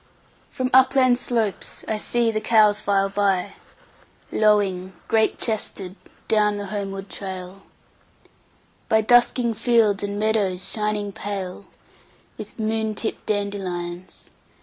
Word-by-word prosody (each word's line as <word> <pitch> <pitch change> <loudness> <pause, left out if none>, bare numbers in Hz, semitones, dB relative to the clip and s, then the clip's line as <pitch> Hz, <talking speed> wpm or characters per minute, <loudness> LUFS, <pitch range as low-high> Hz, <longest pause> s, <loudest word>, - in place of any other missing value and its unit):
1From 255 -1 -1
upland 260 -1 +5
slopes 225 -5 -2
I 220 - -1
see 235 +2 +1
the 215 -1 -2
cows 215 -2 +4
file 195 -1 +1
by,2Lowing, 200 - -2
great 220 -1 +2
chested, 200 -4 -1 0.3
down 210 -1 +2
the 205 - -5
homeward 195 -1 -4 1.8
trail,3By 220 -1 +3
dusking 245 0 +4
fields 220 -3 +2
and 205 0 -3
meadows 205 -4 +1
shining 210 -2 -1
pale4With 195 -1 -9
moon 220 -1 -1
tipped 220 - -4
dandelions. 185 -4 -4
210 Hz, 100 wpm, -23 LUFS, 195-225 Hz, 1.8 s, upland